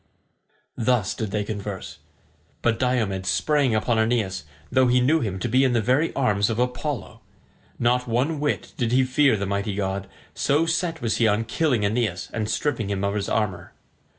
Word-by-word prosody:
Thus 115 -4 +1
did 110 -3 -4
they 105 +1 -1
converse. 100 -2 -6 0.6
But 115 -1 +2
Diomed 110 -7 0
sprang 145 -3 +2
upon 110 +1 +1
Aeneas, 110 -8 0 0.3
though 130 0 +4
he 125 +1 +4
knew 145 +6 +3
him 100 -9 -2
to 95 - -2
be 130 +3 +3
in 130 -2 +2
the 120 - +3
very 130 +9 +2
arms 105 -6 +2
of 110 - -2
Apollo. 125 +3 -3 0.6
Not 125 +1 +1
one 130 +7 0
whit 145 0 -2
did 120 -3 0
he 130 +1 +4
fear 130 -1 +3
the 100 - -2
mighty 100 +1 -2
god, 100 -1 -3 0.2
so 150 +4 +2
set 165 -2 -1
was 115 -2 0
he 115 - +3
on 105 +1 +2
killing 120 -2 0
Aeneas 105 -4 -1
and 110 -1 -2
stripping 120 -9 -1
him 100 -1 -2
of 100 0 0
his 105 -1 -2
armour. 105 -5 -2
115 Hz, 180 wpm, -24 LUFS, 105-130 Hz, 0.6 s, though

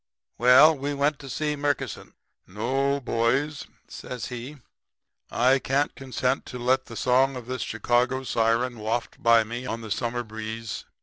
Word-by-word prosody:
"Well, 130 +6 +7
we 140 +1 -3
went 145 +1 +1
to 135 - -10
see 150 +3 -1
Murkison. 145 0 -3 0.3
"'No, 135 +8 0
boys,' 135 +4 0 0.2
says 125 -3 -7
he. 125 +4 -7 0.7
'I 130 +3 +3
can't 140 +3 0
consent 130 -1 -2
to 125 - -7
let 130 +2 +1
the 115 - -9
song 130 +2 +3
of 125 -2 -7
this 130 -1 -4
Chicago 120 +4 0
siren 115 0 0
waft 110 +3 -3
by 115 -1 +5
me 120 +3 -6
on 115 -1 -4
the 110 -2 -8
summer 120 +2 -1
breeze. 110 0 -6
125 Hz, 150 wpm, -26 LUFS, 115-135 Hz, 0.7 s, Well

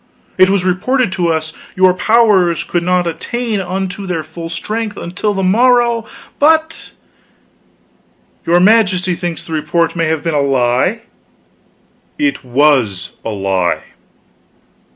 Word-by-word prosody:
It 185 0 +5
was 195 -2 +1
reported 200 +6 0
to 180 -2 -1
us 160 -1 -1
that - - -21 0.2
your 185 0 +4
powers 195 -5 +2
could 175 - -2
not 180 0 +1
attain 215 +6 -3
unto 190 +1 -4
their 170 -3 -2
full 165 +2 -8
strength 210 +5 -4
until 200 +4 -3
the 195 - -1
morrow; 235 +3 +2 0.3
but 320 +2 +1 0.7
" - - -39
"Your 175 +1 +4
Majesty 185 -2 +3
thinks 175 -1 -5
the 165 - -8
report 165 +2 0
may 165 -1 0
have 160 -1 -1
been 165 -1 -1
a 145 - +2
lie? 135 - +1 1.2
It 290 -2 -1
was 125 -7 +1
a - - -4
lie." 95 -4 -1
180 Hz, 135 wpm, -15 LUFS, 160-210 Hz, 1.2 s, It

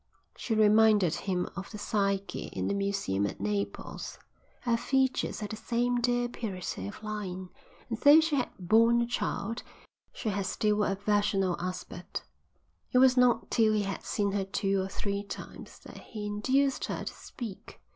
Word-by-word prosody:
She 225 - -2
reminded 215 -4 +5
him 180 -2 -1
of 195 - -6
the 215 - -7
Psyche 200 -1 -1
in - - -2
the - - 0
museum 195 - 0
at - - -7
Naples. 100 0 -3 0.4
Her 235 -2 +2
features 265 -1 0
had 210 - -4
the - - -3
same 240 +2 0
dear 245 0 +2
purity 185 - -5
of 100 - -9
line, 190 -4 -4 0.4
and 230 -2 -4
though 290 +2 +8
she 320 -2 +1
had 255 -3 0
borne 225 +6 +4
a - - 0
child 230 -1 -2 0.5
she 220 - -3
had 200 -2 -1
still 210 -1 +1
a 195 - +1
virginal 200 -2 +1
aspect. 180 +1 -5 0.7
It - - +3
was 255 0 +6
not 250 -2 +3
till 220 -2 +4
he 210 -1 +2
had 195 -1 -3
seen 200 -1 0
her 200 0 0
two 195 0 0
or 190 - -2
three 200 +1 -3
times 200 - -9
that - - -10
he 215 -2 -7
induced 260 +7 +1
her - - -4
to - - -5
speak. 220 -6 -9
210 Hz, 170 wpm, -30 LUFS, 195-235 Hz, 0.7 s, though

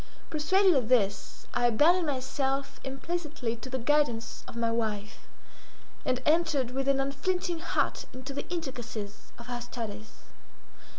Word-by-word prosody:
Persuaded 370 +5 +4
of 250 -6 +1
this, 210 -6 +1
I 240 - +3
abandoned 320 +9 +5
myself 270 0 -1
implicitly 285 -3 -3
to 260 - -8
the 260 - -1
guidance 250 -3 +1
of - - -9
my 230 -1 +1
wife, 215 -3 -2 0.8
and 255 -1 +1
entered 305 -6 +3
with 270 +1 -1
an 275 -1 +4
unflinching 340 +5 0
heart 335 - 0
into 260 +2 -7
the 280 - -5
intricacies 240 - -5
of 235 - -10
her 245 -1 -4
studies. 220 -3 -7
265 Hz, 135 wpm, -30 LUFS, 235-300 Hz, 0.8 s, abandoned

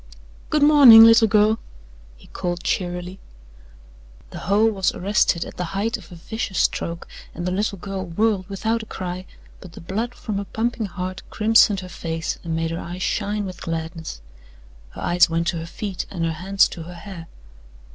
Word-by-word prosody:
"Good 300 -1 +2
morning, 280 -7 +9
little 225 0 +7
girl!" 215 +1 +3 0.6
he - - -18
called 175 -1 -4
cheerily. 180 +1 -3 1.1
The - - -7
hoe 205 +4 +2
was 200 -5 +1
arrested 190 -3 +1
at - - -11
the 180 - -2
height 225 +4 0
of 195 -7 -11
a - - -9
vicious 190 +2 -5
stroke 170 0 -1 0.3
and 175 - -5
the 180 - -1
little 200 +2 -1
girl 190 0 -5
whirled 200 +2 0
without 220 +4 -1
a 220 - -11
cry, 185 -1 -6 0.3
but 180 -3 -13
the - - -10
blood 220 +8 -4
from 210 -3 -4
her 200 - -4
pumping 225 +1 -2
heart 180 +1 -5
crimsoned 215 -2 +4
her 185 - -8
face 165 -2 -4
and 165 -2 -3
made 165 0 -1
her 165 - -3
eyes 180 +2 -6
shine 210 0 -1
with 185 -2 -8
gladness. 160 - -5 0.7
Her - - -11
eyes 175 0 +4
went 165 +1 0
to 175 - -2
her 165 0 -6
feet 195 +2 -5
and 170 -3 -3
her 165 - 0
hands 190 +4 +2
to 170 - -8
her 175 +2 -9
hair. 170 -2 -9
185 Hz, 185 wpm, -22 LUFS, 170-215 Hz, 1.1 s, morning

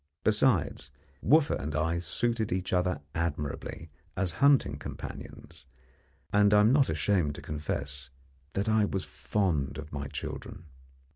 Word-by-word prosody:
Besides, 105 - +2 0.3
Wooffa 155 0 +4
and 75 +2 -4
I 80 +2 +1
suited 110 +6 -1
each 90 +1 -1
other 90 -4 +1
admirably 80 -1 -3 0.3
as 95 -2 +1
hunting 140 -1 +4
companions, - - -9 0.7
and 105 0 +5
I 105 - +7
am 110 +4 +5
not 140 -1 +4
ashamed 80 -2 +1
to - - -8
confess 70 -3 -4 0.4
that 100 +3 -1
I 110 -1 +4
was 95 -2 -1
fond 85 -10 -1
of 75 0 -8
my 70 0 -3
children. 80 - -6
90 Hz, 135 wpm, -29 LUFS, 75-105 Hz, 0.7 s, I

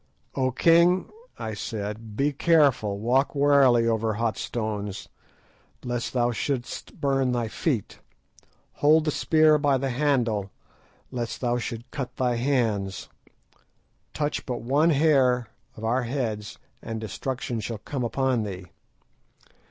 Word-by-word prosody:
"O 130 -1 +1
king," 170 +7 +4 0.3
I 110 - -4
said, 105 +1 -5
"be 145 +1 +1
careful, 140 -10 +3
walk 125 +7 +1
warily 140 -5 +4
over 110 -1 0
hot 115 0 0
stones, 105 -4 -4 0.8
lest 120 -1 -3
thou 120 -1 +2
shouldst 125 +1 -4
burn 135 -2 +1
thy 120 -2 -1
feet; 125 - -2 0.8
hold 155 +2 +5
the 155 - +1
spear 155 0 +4
by 145 -2 +2
the 135 0 -2
handle, 120 -7 0 0.6
lest 120 -2 -4
thou 120 -1 +1
should 115 0 -6
cut 130 -4 -5
thy 125 -2 0
hands. 115 -7 -1 1.0
Touch 150 0 -2
but 120 -3 -3
one 145 +7 +3
hair 135 -6 +3 0.3
of 110 - -9
our 120 +4 +1
heads, 115 -4 -3 0.2
and 115 -1 -5
destruction 120 +3 -4
shall 110 +1 -4
come 125 +5 -4
upon 130 0 0
thee. 95 -3 -5
125 Hz, 130 wpm, -26 LUFS, 110-140 Hz, 1.0 s, hold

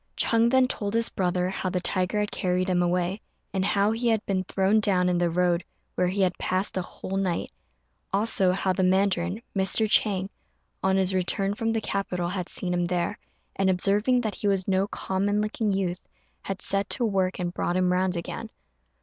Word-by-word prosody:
Ch'êng 230 0 +3
then 260 0 +4
told 205 -3 -3
his 230 0 +3
brother 180 -1 0
how 185 0 -2
the 180 - -1
tiger 185 +3 0
had 210 - -2
carried 185 -1 0
him 180 -1 +2
away, 180 +3 0 0.3
and 190 -1 0
how 200 +1 +2
he 230 +2 -1
had 225 -2 +1
been 190 -2 0
thrown 195 +3 +2
down 185 -4 +2
in 180 -1 +1
the 175 -1 +2
road, 175 0 +1 0.3
where 180 - +1
he 190 +2 -1
had 185 -1 +1
passed 185 +2 -1
a 185 - 0
whole 190 +1 -6
night; 185 -3 -1 0.6
also 195 -2 +2
how 190 0 0
the 190 - -1
mandarin, 185 +2 +1
Mr. 195 +3 +2
Chang, 195 -3 +2 0.5
on 190 0 +2
his 190 0 +1
return 195 +2 0
from 225 +2 -1
the 225 -1 -1
capital, 180 -4 -2
had 185 -1 -4
seen 180 -2 0
him 175 0 +1
there, 180 +3 -1 0.4
and, 195 -1 +1
observing 205 +7 +2
that 215 -3 -2
he 205 - -3
was 195 -2 +1
no 195 0 +2
common 200 +1 -1
looking 215 0 -1
youth, 185 -2 -2 0.3
had 195 -1 -5
set 195 0 +2
to 245 - +1
work 190 -3 0
and 175 -1 -3
brought 175 - -1
him 180 -1 +2
round 185 0 +1
again. 195 +6 -5
190 Hz, 200 wpm, -26 LUFS, 180-205 Hz, 0.6 s, then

